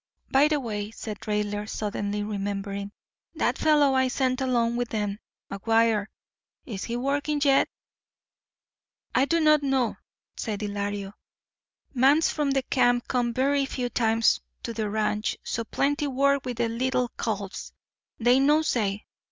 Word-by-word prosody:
"By 275 +3 +5
the 300 -1 +1
way," 210 -5 -4
said 215 -2 -7
Raidler, 210 0 -1
suddenly 205 -1 -2
remembering, 200 -1 -4 0.4
"that - - 0
fellow 295 -3 +4
I 260 0 +3
sent 255 0 0
along 235 -3 +1
with 245 -1 -2
them—McGuire—is 215 0 -3
he 235 0 -3
working 285 +3 0
yet?" 275 -1 +4 1.4
"I 260 - +4
do 335 +3 +1
not 305 -1 +5
know," 265 -4 0 0.4
said 215 -2 -4
Ylario. 205 -1 -3 0.8
"Mans 275 +5 +4
from 295 -2 -1
the 270 -1 +1
camp 245 -2 +2
come 245 -2 0
verree 275 +3 +1
few 250 -2 -3
times 225 -1 +2 0.2
to 230 - -4
the 215 -2 -2
ranch. 210 0 -1
So 230 - -2
plentee 290 +5 0
work 280 0 +1
with 245 -2 -4
the 235 -1 +1
leetle 250 +1 -1
calves. 205 -3 -4 0.5
They 245 +3 +4
no 295 +3 +4
say. 210 -8 -1
240 Hz, 135 wpm, -26 LUFS, 210-270 Hz, 1.4 s, By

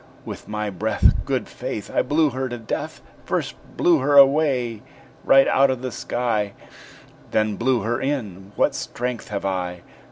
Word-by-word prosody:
With - - -8
my 105 -1 -3
breath, 105 +3 +2
Good - - -1
faith! - - -6
I - - +3
blew 150 +2 +2
her 130 +1 -3
to 120 - -5
death 115 - -5 0.2
First - - -2 0.2
blew 170 -3 +4
her 140 +2 +3
away 135 -5 +4 0.4
right 135 0 +6
out 135 +1 +4
of 130 -1 -2
the 130 - -3
sky 110 -1 -2 0.8
Then 110 -1 +1
blew 125 +1 +1
her 120 +5 -1
in; 105 -9 -3
what - - +2
strength 125 -2 -4
have 100 -2 -4
I!" 90 -2 -3
120 Hz, 160 wpm, -23 LUFS, 105-135 Hz, 0.8 s, right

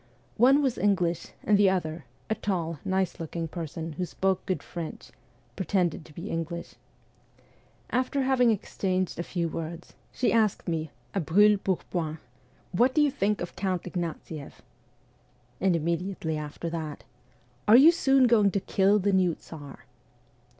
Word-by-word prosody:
One 270 +5 +5
was 260 -4 0
English, 180 -4 +1 0.2
and 205 -1 +3
the 200 -2 +6
other 165 -4 -2 0.2
a 220 - +1
tall, 170 -7 -2
nice 190 -1 -1
looking 165 0 -4
person, 165 0 -5
who 180 +4 -3
spoke 190 +3 0
good 185 - -1
French 170 -3 -7 0.4
pretended 180 -3 0
to 155 - -15
be 180 +5 -6
English. 165 +1 -4 1.2
After 260 +2 +1
having 260 -2 +3
exchanged 185 -4 -1
a - - +1
few 170 0 -2
words, 165 +1 -6 0.2
she 250 - +1
asked 220 -3 +2
me 160 -2 -2 0.2
a - - 0
brule 200 +6 +4
pourpoint: 170 -4 -2 0.3
' - - -34
What 250 +2 +4
do 305 - +5
you 290 - +3
think 210 -6 0
of 175 - -5
Count 185 -3 -1
Ignatieff? 165 -4 -6 0.5
' 125 0 -35
And 190 -2 +3
immediately 170 0 -2
after 150 +2 -5
that: 155 -3 -5 0.3
' 120 +1 -35
Are 220 +3 +9
you 300 +6 +9
soon 270 -6 +4
going 220 -4 +5
to 200 - 0
kill 195 +2 +3
the 200 0 +1
new 180 -3 +3
Tsar 145 -4 -11
180 Hz, 155 wpm, -27 LUFS, 165-205 Hz, 1.2 s, Are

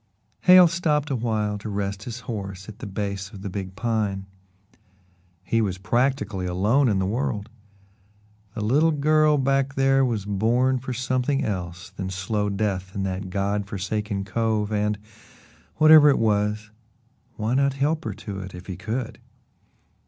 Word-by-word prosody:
Hale 180 -1 +9
stopped 160 -3 0
a - - +1
while 110 -3 -1
to 105 - -6
rest 100 0 -3
his 120 +1 -6
horse 95 -5 -6
at 110 0 -10
the - - -6
base 100 -1 -4
of 100 -3 -11
the 100 - -4
big 95 -1 -5
pine. 105 -3 -1 1.2
He 115 +4 +1
was 95 -4 -1
practically 120 -2 0
alone 105 +10 +2
in 100 - +1
the 95 - 0
world. 105 0 -2 1.0
The 110 - -3
little 140 +10 +3
girl 150 +1 +3
back 135 0 +1
there 135 0 +3
was 115 -6 -1
born 120 +6 +1
for 130 +1 -6
something 130 +3 0
else 90 -3 -5
than 95 -1 -5
slow 100 +3 -1
death 100 -2 -2
in 100 - -2
that 95 0 -3
God 100 +1 -1
forsaken 100 0 -3
cove, 110 0 -1
and 105 0 0 0.8
whatever 155 -1 +8
it 140 - +4
was 105 -1 0 0.6
why 110 +3 -1
not 140 +1 +2
help 150 +4 0
her - - -3
to 100 -2 -7
it 95 -1 -8
if 90 +1 -10
he 95 - -6
could? 115 +4 -4
105 Hz, 160 wpm, -24 LUFS, 100-130 Hz, 1.2 s, Hale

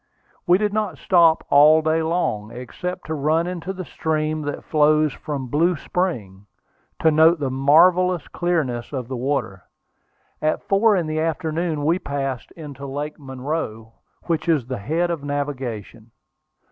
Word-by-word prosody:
We 175 +1 +6
did 210 0 -1
not 210 -7 -1
stop 170 -2 +3
all 155 +2 +6
day 160 +1 +1
long, 160 -11 -1
except 150 +10 -6
to 160 - -4
run 155 +3 +1
into 180 0 -4
the 185 -1 -6
stream 155 -1 -2
that 145 -1 -5
flows 155 -1 +3
from 145 -4 -5
Blue 165 +8 +1
Spring, 105 - -3 0.5
to 160 - +4
note 160 +2 +5
the 135 -3 -2
marvellous 170 +6 +4
clearness 155 -9 -2
of 130 -4 -4
the 130 - -3
water. 125 -7 -2 0.8
At 155 0 0
four 205 +2 +4
in 175 -3 0
the 155 0 -2
afternoon 160 -1 -2
we 170 +4 +2
passed 135 -5 -4
into 140 -4 -9
Lake 145 +3 -5
Monroe, 130 -5 -5 0.3
which 170 0 -2
is 150 -7 +2
the 130 -2 -5
head 165 +11 -1
of 160 -4 -4
navigation. 135 -6 -5
155 Hz, 150 wpm, -22 LUFS, 135-170 Hz, 0.8 s, We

